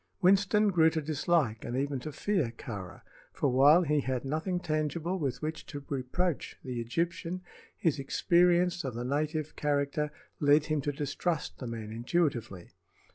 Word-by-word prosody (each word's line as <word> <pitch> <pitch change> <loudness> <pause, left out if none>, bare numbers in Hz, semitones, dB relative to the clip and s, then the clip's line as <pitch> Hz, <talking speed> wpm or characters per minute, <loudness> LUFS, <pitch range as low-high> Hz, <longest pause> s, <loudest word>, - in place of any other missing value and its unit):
Winston 200 +2 +4
grew 160 -3 +5
to 160 - -2
dislike 150 -6 0
and 120 - -3
even 140 0 -1
to 150 +5 -6
fear 160 - 0
Kāra; 100 -6 -7 0.3
for 140 - 0
while 145 +7 +6
he 150 -2 +2
had 130 -1 -2
nothing 160 +6 -1
tangible 160 +3 -1
with 135 -3 -2
which 155 +1 -3
to 145 -1 -7
reproach 140 +5 -2
the 125 -2 -3
Egyptian, 170 +8 -2 0.3
his 155 -4 +1
experience 175 +4 +3
of 130 -4 -4
the 120 +1 -3
native 150 +3 -1
character 145 0 0 0.3
led 145 +1 +4
him 155 -1 0
to 145 - -1
distrust 145 +3 -2
the 125 - -5
man 110 -2 -5
intuitively. 120 - -1
150 Hz, 155 wpm, -30 LUFS, 130-170 Hz, 0.3 s, while